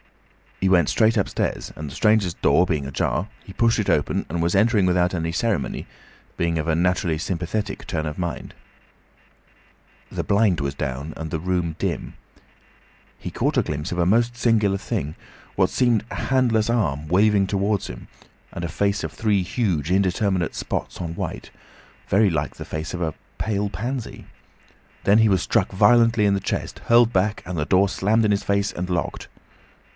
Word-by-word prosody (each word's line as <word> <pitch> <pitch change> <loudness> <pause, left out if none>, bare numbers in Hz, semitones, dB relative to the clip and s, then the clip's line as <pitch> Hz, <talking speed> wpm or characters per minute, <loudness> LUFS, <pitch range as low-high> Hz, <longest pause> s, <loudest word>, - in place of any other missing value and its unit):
He 95 - +2
went 90 -4 +4
straight 110 0 +3
upstairs, 100 - -1
and 75 -1 -6
the 70 - -10
stranger's 105 -5 +2
door 90 +2 +3
being 75 -5 -1
ajar, 80 +8 -1
he 95 - -11
pushed 115 +2 +2
it 105 - -1
open - - +1
and 85 +2 -2
was 85 +1 +1
entering 105 0 +3
without 90 0 +2
any 80 -2 -2
ceremony, 100 - -1 0.5
being 85 -1 0
of 80 - -3
a 80 - +2
naturally 90 -1 +1
sympathetic 95 +4 -3
turn 80 -2 -2
of 75 +3 -5
mind. 85 -2 -4 1.6
The - - -3
blind 100 -5 +2
was 70 0 -2
down 70 +2 -4
and 80 0 -5
the 80 - -2
room 90 -1 -1
dim. - - -3 1.0
He - - -7
caught - - 0
a - - +4
glimpse 75 0 -4
of 90 - -3
a 85 - +2
most 115 +5 +2
singular 110 -5 +2
thing, 75 -5 -3 0.4
what - - +2
seemed 120 -4 +2
a - - -4
handless 120 -4 +1
arm 80 - 0
waving 100 +3 +3
towards 100 0 0
him, - - -9 0.4
and 85 - -6
a 85 - -2
face 100 +5 0
of 80 - -3
three 105 +3 +1
huge 90 - -1
indeterminate 95 -1 +1
spots - - -4
on 85 -1 -4
white, - - -5 0.6
very 100 +1 +4
like 80 -4 -2
the - - -8
face 80 +1 -5
of 90 - -4
a 80 -3 -2 0.2
pale 105 -2 -1
pansy. 120 +7 -5 0.8
Then 105 +2 +5
he 110 -1 +5
was 95 -3 +2
struck - - +1
violently 115 +2 +4
in 100 -1 +3
the - - 0
chest, - - -4
hurled 120 0 +5
back, 100 +3 +1
and 90 -1 -4
the 75 - 0
door 95 +3 +3
slammed 110 +4 +1
in 105 - +3
his 100 - +1
face 100 0 0
and 90 +1 -5
locked. 90 - -2
95 Hz, 180 wpm, -23 LUFS, 85-105 Hz, 1.6 s, Then